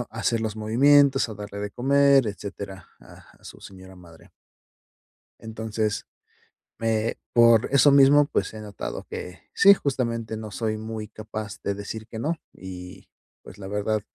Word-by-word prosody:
a 115 - -10
hacer 115 0 0
los 110 -1 -3
movimientos, 135 +4 +4
a 110 - -7
darle 100 0 -8
de 105 0 -4
comer, 140 +2 +3
etcétera, 100 -2 -7
a - - -15 0.3
a - - -25
su - - -12
señora 95 -1 -13
madre. 85 -2 -17 1.1
Entonces, 110 -1 -3 0.7
me 115 0 -1 0.2
por 115 -1 +5
eso 140 +1 +6
mismo, 140 +1 +6
pues, - - -2
he 110 - -8
notado 105 -2 -7
que, 90 0 -8
sí, 200 0 +7
justamente 115 - -2
no 110 -1 -8
soy 110 0 -2
muy 110 0 -6
capaz 110 -1 -8
de 100 - -1
decir 105 +2 -7
que 110 -1 -8
no, 155 +8 -1 0.2
y 90 -1 -10 0.3
pues, - - -13
la 100 -2 -8
verdad, 105 +2 -1
110 Hz, 155 wpm, -24 LUFS, 100-120 Hz, 1.1 s, sí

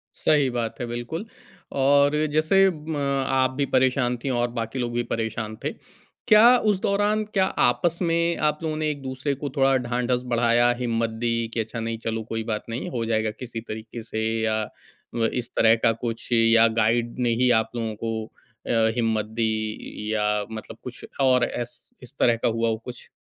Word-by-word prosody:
सही 145 -3 +2
बात 115 -2 -3
है, 120 - -2
बिल्कुल। 120 - -5 0.6
और 140 +2 +4 0.2
जैसे 175 +6 +4
म 155 -1 -6 0.3
आप 130 -1 +2
भी 140 +2 -1
परेशान 130 -1 +2
थी 135 - -1
और 120 -1 +1
बाकी 115 +3 -3
लोग 120 -1 -2
भी 120 0 0
परेशान 110 -1 -3
थे। - - 0 0.6
क्या 230 +4 +8
उस 200 - +1
दौरान 205 +2 +1
क्या 190 -2 +4 0.2
आपस 155 +8 0
में 170 0 +1
आप 150 - -2
लोगों 155 -1 -2
ने 155 0 -1
एक-दूसरे 135 -1 -3
को 145 - -3
थोड़ा 135 -1 +4
ढांढस 125 0 -1
बढ़ाया, 120 +1 +4
हिम्मत 115 -2 0
दी 115 -1 +2 0.2
कि, 115 - 0
"अच्छा 110 +1 -4
नहीं, 115 0 -3
चलो 115 0 -2
कोई 115 0 -3
बात 105 - -3
नहीं 115 +2 -4
हो 120 -3 -2
जाएगा 110 -1 0
किसी 120 -3 -5
तरीके 110 +2 -7
से" 110 0 -4 0.2
या 110 0 +1 0.5
व 115 -1 +1 0.2
इस 115 - -14
तरह 115 0 +6
का 115 - +5
कुछ, 115 0 -5
या 115 0 +5
गाइड 115 +2 +1
ने 125 -1 +1
ही 125 - +4
आप 110 - -14
लोगों 115 -2 -2
को 110 -1 -3 0.3
अ, - - -4 0.3
हिम्मत 110 -3 +1
दी, 110 -1 -2
या 105 -1 +1
मतलब 110 -1 -8
कुछ 125 -1 -8 0.2
और 130 -2 +4
एस 120 0 -6
इस 125 +3 -13
तरह 120 -1 +4
का - - +3
हुआ 115 0 0
हो 110 - 0
कुछ? 125 -1 -10
120 Hz, 185 wpm, -24 LUFS, 115-135 Hz, 0.6 s, क्या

